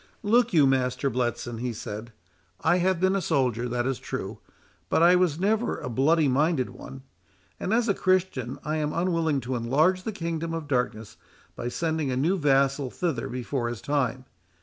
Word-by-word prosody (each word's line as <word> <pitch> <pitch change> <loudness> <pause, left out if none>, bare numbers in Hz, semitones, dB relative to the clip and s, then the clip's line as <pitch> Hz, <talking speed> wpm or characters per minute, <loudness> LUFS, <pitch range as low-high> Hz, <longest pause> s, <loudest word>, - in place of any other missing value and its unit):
"Look 235 +3 +3
you, 155 -6 +5
Master 130 0 +1
Bletson," 120 -1 -2
he 125 0 -2
said, 110 +1 -7 0.5
"I 170 +3 +3
have 185 0 +1
been 190 +1 +2
a 195 - 0
soldier, 125 -7 0
that 120 0 -1
is 135 -1 -1
true, - - -5 0.5
but 165 - +3
I 175 +1 +7
was 175 -4 +2
never 215 +5 +1
a 125 - -5
bloody 150 +5 +3
minded 140 0 +1
one; 135 0 -10 0.6
and, 190 - -3
as 235 +1 +2
a 200 - +3
Christian, 185 -11 0
I 155 +2 -1
am 150 -1 -1
unwilling 165 -5 0
to 125 +1 -3
enlarge 150 +11 +2
the 220 - -4
kingdom 165 -4 -3
of 160 -3 -5
darkness 115 -5 -2 0.4
by - - -4
sending 160 +2 -1
a 125 - -1
new 165 +9 +2
vassal 140 -2 +2
thither 155 -5 -2
before 125 0 -2
his 120 -2 -5
time. 130 -2 -1
145 Hz, 180 wpm, -26 LUFS, 125-170 Hz, 0.6 s, I